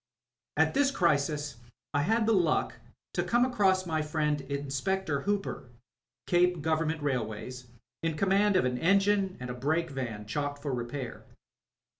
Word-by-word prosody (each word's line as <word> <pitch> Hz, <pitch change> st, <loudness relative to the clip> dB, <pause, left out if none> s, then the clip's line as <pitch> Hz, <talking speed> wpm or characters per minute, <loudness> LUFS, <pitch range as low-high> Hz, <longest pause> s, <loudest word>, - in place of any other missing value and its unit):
At -, -, +3 dB
this 280 Hz, 0 st, +3 dB
crisis 150 Hz, -, +1 dB, 0.4 s
I 145 Hz, -, +2 dB
had 220 Hz, +8 st, +2 dB
the 225 Hz, -, +3 dB
luck 175 Hz, -6 st, +2 dB, 0.4 s
to -, -, +1 dB
come 240 Hz, +1 st, +3 dB
across 195 Hz, -7 st, +2 dB
my 160 Hz, -2 st, 0 dB
friend 150 Hz, -1 st, 0 dB
Inspector 140 Hz, +4 st, -2 dB
Hooper, 200 Hz, -9 st, -2 dB, 0.6 s
Cape 175 Hz, -2 st, +2 dB
Grovemment 160 Hz, -1 st, 0 dB
Railways, 125 Hz, -1 st, -3 dB, 0.3 s
in 165 Hz, -2 st, -1 dB
conmiand 195 Hz, +3 st, +3 dB
of 185 Hz, -, +4 dB
an 125 Hz, -1 st, -1 dB
engine 195 Hz, +1 st, +3 dB
and 125 Hz, 0 st, -5 dB
a -, -, -4 dB
brake 155 Hz, +6 st, 0 dB
van 115 Hz, -6 st, -4 dB
chalked 145 Hz, +5 st, -3 dB
for 140 Hz, -3 st, -2 dB
repair. 120 Hz, +1 st, -5 dB
155 Hz, 145 wpm, -29 LUFS, 140-190 Hz, 0.6 s, of